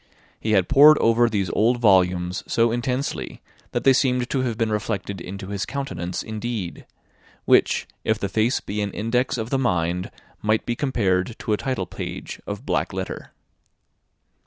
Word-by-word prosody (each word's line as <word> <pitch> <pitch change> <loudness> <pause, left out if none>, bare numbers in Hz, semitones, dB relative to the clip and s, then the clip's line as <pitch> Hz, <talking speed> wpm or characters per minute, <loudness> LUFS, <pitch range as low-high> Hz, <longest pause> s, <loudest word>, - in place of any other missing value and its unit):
He 110 - -1
had 95 -3 +3
pored 150 +2 +8
over 115 +1 +3
these 100 -5 -1
old 120 +3 +2
volumes 90 -3 +2
so 115 0 +2
intensely, 125 +3 -2 0.3
that - - -2
they 135 - +6
seemed 125 -2 +1
to 135 - +1
have 120 -4 -2
been 115 -2 0
reflected 100 -2 -3
into 95 +2 -7
his 100 -1 -2
countenance 95 -11 -4
indeed; 110 -4 -5 0.6
which, - - +3 0.2
if 110 - +1
the 100 - -2
face 110 +5 +1
be 105 +1 -3
an 100 - -1
index 125 +4 0
of 115 0 -4
the 135 - +2
mind, 90 -6 0 0.3
might 110 +1 +1
be 120 - -1
compared 110 -6 0
to 110 - -2
a - - +2
title 130 -7 -2
page 90 +3 -7
of - - -5
black - - -1
letter. - - -5
110 Hz, 165 wpm, -23 LUFS, 95-120 Hz, 0.6 s, pored